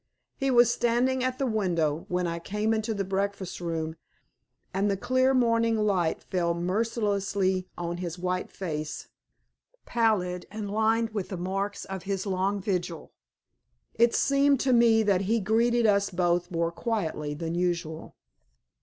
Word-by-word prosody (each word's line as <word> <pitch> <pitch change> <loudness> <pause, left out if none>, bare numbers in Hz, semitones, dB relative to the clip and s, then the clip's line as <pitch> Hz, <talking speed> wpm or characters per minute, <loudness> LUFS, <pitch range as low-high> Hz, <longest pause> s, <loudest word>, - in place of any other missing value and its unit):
He 270 -1 -1
was 240 -2 +5
standing 250 +2 +1
at 255 0 -1
the 270 - 0
window 170 - 0
when 180 0 0
I 170 0 -2
came 210 +5 -1
into 220 0 -1
the 200 - -1
breakfast 195 -1 -3
room, 160 -1 -3 0.8
and 195 +2 +1
the 195 - 0
clear 255 +5 +2
morning 230 -3 +2
light 195 -6 +1
fell 170 -2 0
mercilessly 195 -1 0
on 175 0 -3
his 175 -1 -5
white 180 +1 -2
face, 155 -5 -5 0.8
pallid 200 -7 0
and 210 -1 -5
lined 225 +1 +1
with 205 -4 -4
the 190 - -4
marks 195 +3 -3
of 190 -1 -6
his 195 +1 -3
long 195 +1 0
vigil. 180 -4 -3 0.8
It 235 +1 +3
seemed 280 -1 +3
to 260 -1 +2
me 230 -2 +5
that 200 -3 +2
he 230 +1 +3
greeted 230 +3 +2
us 200 -1 +3
both 175 -1 0
more 170 -2 -1
quietly 165 -8 -2
than 165 +2 -4
usual. 170 -2 -2
195 Hz, 150 wpm, -27 LUFS, 175-225 Hz, 0.8 s, was